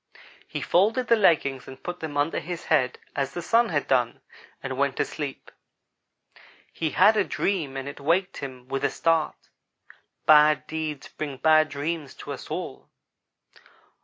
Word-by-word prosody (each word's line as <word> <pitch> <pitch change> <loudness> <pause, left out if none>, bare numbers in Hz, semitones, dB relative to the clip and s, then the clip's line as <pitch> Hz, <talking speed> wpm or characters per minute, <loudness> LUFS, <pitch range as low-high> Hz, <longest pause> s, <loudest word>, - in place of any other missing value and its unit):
"He - - -5
folded 225 +8 +2
the 230 - +7
leggings 145 - +2
and 130 0 -11
put 175 0 -5
them 155 -3 -5
under 145 +3 +1
his 170 +1 -6
head 130 -5 +2 0.2
as 135 -1 -2
the 175 - -3
Sun 230 +5 +3
had 145 -4 -1
done, 120 -3 +1 0.4
and 130 0 -3
went 140 0 0
to - - +1
sleep. 145 -3 -6 1.2
He 160 - -1
had 205 +7 +5
a 210 - +3
dream 160 -9 -2
and 135 0 -5
it 140 - -7
waked 175 +6 +1
him 130 -2 -8
with 135 +1 -3
a - - +3
start. 165 -2 +1 0.9
Bad 150 -1 +6
deeds 155 -3 -4
bring 145 -3 -6
bad 155 +2 +4
dreams 145 +1 -4
to - - -7
us - - -9
all. - - -6
155 Hz, 160 wpm, -25 LUFS, 140-170 Hz, 1.2 s, the